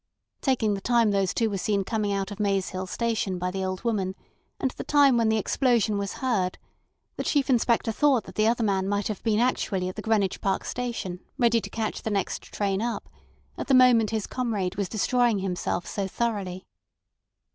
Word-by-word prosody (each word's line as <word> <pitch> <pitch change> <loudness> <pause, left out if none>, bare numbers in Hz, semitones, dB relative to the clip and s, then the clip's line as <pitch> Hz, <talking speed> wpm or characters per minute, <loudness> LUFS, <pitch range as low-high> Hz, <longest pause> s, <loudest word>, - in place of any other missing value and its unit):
Taking 230 -6 +1
the 195 - -4
time 235 -1 +3
those 195 -2 +1
two 230 - +1
were 200 -3 -2
seen 200 0 0
coming 210 0 -1
out 195 0 -2
of 205 - -7
Maze 195 -2 +1
Hill 185 0 -5
Station 220 -3 -1
by 180 +1 -2
the 190 0 -3
old 185 0 -3
woman, 195 -5 -1 0.4
and 265 - 0
the - - -7
time 285 -3 +5
when 230 -2 +3
the 220 - +2
explosion 230 -1 +2
was 200 0 -2
heard, 190 -8 0 0.6
the - - -2
Chief 280 -2 +1
Inspector 235 -1 +2
thought 265 +1 +3
that - - -11
the 215 0 +2
other 235 0 +2
man 195 -2 +1
might 205 +1 0
have 210 - -4
been 220 -2 +1
actually 205 -6 0
at 185 - -8
the 215 - -5
Greenwich 210 -4 0
Park 195 -1 0
Station, 235 -8 -4 0.2
ready 235 -3 +3
to - - -7
catch 220 -1 -3
the - - -3
next 200 -3 -1
train 200 -1 -2
up, 235 +1 -3 0.5
at - - -4
the 270 - +4
moment 245 -4 +6
his 220 -2 -2
comrade 215 -8 -2
was 200 -2 -2
destroying 240 +1 +2
himself 180 -2 -2
so 200 -2 -3
thoroughly. 195 -4 -3
215 Hz, 200 wpm, -26 LUFS, 195-235 Hz, 0.6 s, moment